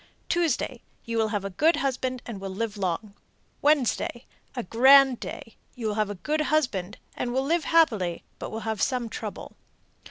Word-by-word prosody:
Tuesday 305 Hz, -7 st, 0 dB, 0.2 s
you 230 Hz, -, -3 dB
will 220 Hz, -, +2 dB
have 205 Hz, -2 st, -2 dB
a 195 Hz, -, -4 dB
good 315 Hz, -, +3 dB
husband 255 Hz, -2 st, -2 dB
and 210 Hz, -5 st, -7 dB
will 195 Hz, -, -4 dB
live 210 Hz, +3 st, -3 dB
long. 200 Hz, +1 st, -2 dB, 0.5 s
Wednesday 270 Hz, -4 st, +1 dB, 0.3 s
a 245 Hz, -, -2 dB
grand 265 Hz, +4 st, +6 dB
day; 225 Hz, -, -8 dB, 0.2 s
you 240 Hz, -, -6 dB
will 215 Hz, -, 0 dB
have 210 Hz, -1 st, 0 dB
a 205 Hz, -, -4 dB
good 300 Hz, -, -1 dB
husband, 245 Hz, -11 st, 0 dB, 0.2 s
and 240 Hz, -, -2 dB
will 265 Hz, +2 st, 0 dB
live 330 Hz, +2 st, +1 dB
happily, 220 Hz, -, +2 dB, 0.2 s
but -, -, -5 dB
will 220 Hz, -, -5 dB
have 220 Hz, -1 st, -3 dB
some 250 Hz, -3 st, 0 dB
trouble. -, -, -7 dB
235 Hz, 180 wpm, -26 LUFS, 210-275 Hz, 0.5 s, grand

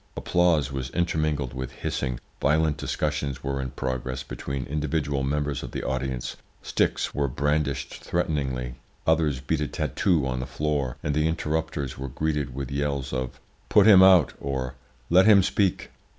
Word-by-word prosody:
Applause 85 Hz, -6 st, +2 dB
was 65 Hz, -1 st, -3 dB
intermingled 75 Hz, -5 st, 0 dB
with 65 Hz, 0 st, -5 dB
hissing, 65 Hz, -2 st, -3 dB, 0.2 s
violent 75 Hz, +2 st, +3 dB
discussions 70 Hz, -3 st, -2 dB
were 70 Hz, -1 st, -2 dB
in 65 Hz, -, -3 dB
progress 65 Hz, 0 st, -3 dB
between 70 Hz, 0 st, -5 dB
individual 75 Hz, -1 st, -1 dB
members 70 Hz, +1 st, -1 dB
of -, -, -6 dB
the -, -, -3 dB
audience, 65 Hz, -2 st, -3 dB, 0.3 s
sticks -, -, 0 dB
were 70 Hz, -1 st, 0 dB
brandished 70 Hz, 0 st, -1 dB
threateningly, 65 Hz, -7 st, -1 dB, 0.3 s
others 80 Hz, -5 st, +2 dB
beat 75 Hz, +3 st, -1 dB
a 75 Hz, -, 0 dB
tattoo 85 Hz, -3 st, +1 dB
on 65 Hz, -1 st, -2 dB
the 65 Hz, -, -4 dB
floor, 75 Hz, -4 st, -1 dB
and 75 Hz, -, 0 dB
the 75 Hz, +2 st, +2 dB
interrupters 80 Hz, -4 st, -2 dB
were 70 Hz, 0 st, -4 dB
greeted 75 Hz, -1 st, -2 dB
with 70 Hz, -2 st, -4 dB
yells 70 Hz, -2 st, -2 dB
of 65 Hz, -1 st, -3 dB, 0.3 s
`Put -, -, +6 dB
him 100 Hz, -4 st, +9 dB
out!' 95 Hz, -6 st, +7 dB
or 65 Hz, -2 st, -3 dB, 0.4 s
`Let 95 Hz, +3 st, +7 dB
him 105 Hz, -3 st, +7 dB
speak!' 95 Hz, 0 st, 0 dB
70 Hz, 155 wpm, -26 LUFS, 65-80 Hz, 0.4 s, him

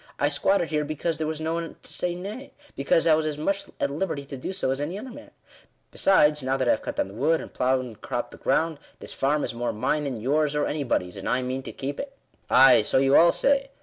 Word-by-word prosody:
I 145 Hz, -, +2 dB
squatted 170 Hz, +4 st, +1 dB
here 150 Hz, -1 st, 0 dB
because 155 Hz, +2 st, -3 dB
there 155 Hz, -, -1 dB
was 155 Hz, 0 st, -3 dB
no 160 Hz, +1 st, -2 dB
one 165 Hz, 0 st, -4 dB
to -, -, -9 dB
say 175 Hz, -1 st, -2 dB
nay 210 Hz, +9 st, -8 dB
— 290 Hz, -, -25 dB
because 140 Hz, +4 st, +2 dB
I 165 Hz, -, +5 dB
was 155 Hz, 0 st, +1 dB
as 150 Hz, -1 st, -3 dB
much 195 Hz, +6 st, -1 dB
at 140 Hz, -, 0 dB
liberty 150 Hz, -2 st, -3 dB
to 140 Hz, -, -8 dB
do 130 Hz, -, -5 dB
so 190 Hz, -8 st, -1 dB
as 135 Hz, +1 st, -2 dB
any 165 Hz, +6 st, -3 dB
other 250 Hz, +5 st, -8 dB
man. -, -, -12 dB, 0.6 s
Besides, 150 Hz, -6 st, +4 dB
now 130 Hz, +1 st, 0 dB
that 130 Hz, -2 st, -1 dB
I -, -, +5 dB
have -, -, 0 dB
cut -, -, -5 dB
down -, -, 0 dB
the 95 Hz, -, -12 dB
wood, 155 Hz, +9 st, +1 dB
and -, -, -9 dB
ploughed 130 Hz, +1 st, +1 dB
and 115 Hz, -4 st, -11 dB
cropped -, -, -4 dB
the -, -, -11 dB
ground, 160 Hz, -2 st, 0 dB, 0.2 s
this -, -, -8 dB
farm 145 Hz, +2 st, 0 dB
is -, -, -3 dB
more 120 Hz, +1 st, -2 dB
mine 150 Hz, +8 st, -1 dB
than 130 Hz, -5 st, -3 dB
yours, 150 Hz, +5 st, +1 dB
or 150 Hz, -, +1 dB
anybody's; 120 Hz, -11 st, -2 dB
and 95 Hz, -, -4 dB
I 125 Hz, +1 st, +1 dB
mean 130 Hz, +1 st, -3 dB
to -, -, -8 dB
keep 140 Hz, +1 st, -5 dB
it." 275 Hz, 0 st, -7 dB, 0.2 s
" -, -, -40 dB
Ay, 135 Hz, -2 st, +7 dB
so 105 Hz, -, 0 dB
you 135 Hz, +1 st, +4 dB
all 170 Hz, +1 st, +7 dB
say. 275 Hz, -1 st, +1 dB
150 Hz, 270 wpm, -25 LUFS, 135-165 Hz, 0.6 s, Ay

